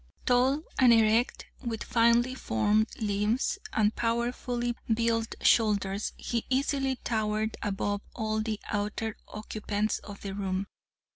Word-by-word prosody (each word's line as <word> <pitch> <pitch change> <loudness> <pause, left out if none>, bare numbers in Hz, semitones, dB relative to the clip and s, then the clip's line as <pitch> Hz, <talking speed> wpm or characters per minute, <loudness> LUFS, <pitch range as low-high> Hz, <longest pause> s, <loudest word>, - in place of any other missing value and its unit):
"Tall 260 +4 +3 0.2
and 250 -2 +7
erect, 225 +1 +3 0.2
with 230 -3 -3
finely 235 +2 +3
formed 210 - +1
limbs, 215 - 0
and 215 0 +2
powerfully 240 +1 -1 0.2
built 230 0 +1
shoulders, 205 -2 +2
he 235 -2 -2
easily 270 0 +1
towered 220 -1 0
above 205 0 -1
all 220 -2 -1
of 215 - -1
the 215 -2 -2
other 210 +1 -2
occupants 210 0 -2
of 200 -1 -10
the 195 -1 -5
room. 195 -1 -2
220 Hz, 125 wpm, -29 LUFS, 210-240 Hz, 0.2 s, and